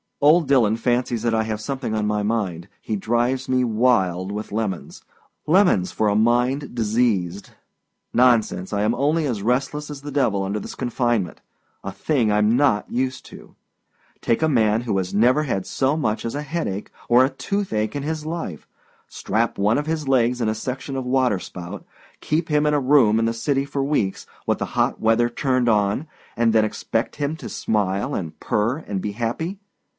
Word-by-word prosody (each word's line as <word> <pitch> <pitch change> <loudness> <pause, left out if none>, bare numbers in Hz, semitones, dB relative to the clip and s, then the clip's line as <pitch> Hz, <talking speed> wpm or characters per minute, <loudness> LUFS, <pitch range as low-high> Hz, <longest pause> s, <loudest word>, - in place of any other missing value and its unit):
Old 155 +2 +5
Dillon 115 -6 +3
fancies 120 -1 0
that 115 -1 +1
I 110 0 +2
have 110 -1 -3
something 130 -1 -3
on 105 -1 0
my 105 0 0
mind. 100 -6 -2
He 110 - -3
drives 120 +5 0
me 130 -1 +2
wild 105 -6 +1
with 105 +1 -5
lemons. 105 -4 -4 0.4
Lemons 160 - +3
for 110 - 0
a 100 - +1
mind 120 +6 +1
diseased! 105 -5 0 0.6
Nonsense. 115 -6 +2
I 100 - 0
am 110 +2 +2
only 150 +5 +1
as 120 -7 -2
restless 135 +6 -1
as 145 -2 -7
the 145 0 -7
devil 120 -9 +1
under 100 +2 -2
this - - -8
confinement 120 -7 -1 0.4
a 100 - -4
thing 130 0 0
Iâm 105 +1 +3
not 125 -4 +2
used 130 +1 -2
to. - - -14 0.7
Take 115 - +1
a 160 - +3
man 110 -5 +2
who 115 -5 -1
has 95 -1 -2
never 125 +8 +4
had 100 -10 -2
so 135 +2 +1
much 110 -8 -1
as 115 - -3
a 145 - -3
headache 140 - -4 0.2
or 120 +2 +6
a - - 0
toothache 135 - -2
in 140 - -3
his 155 0 -3
life, 160 - -5 0.4
strap 115 +1 -1
one 105 +3 +3
of 150 - -4
his 160 -3 -2
legs 125 -2 +2
in 110 - +1
a 110 - -1
section 130 +4 -5
of 130 -1 -3
water 125 -5 +2
spout, 90 -1 -8 0.4
keep 160 +2 -1
him 150 0 +2
in 150 - +2
a - - +3
room 130 -5 +4
in 115 - +1
the 115 - 0
city 135 +4 0
for 140 -1 -2
weeks, 135 -9 -1 0.2
with - - +2
the - - -1
hot - - +1
weather 115 +2 +3
turned 130 0 +1
on, 105 +7 +1 0.3
and 115 -1 +2
then 110 -1 +4
expect 115 +2 -2
him 145 +1 -2
to - - -8
smile 100 -2 -1
and 80 -4 -5
purr 115 +7 0
and 100 -2 -2
be 105 - -3
happy! 125 - -3
120 Hz, 190 wpm, -22 LUFS, 105-135 Hz, 0.7 s, or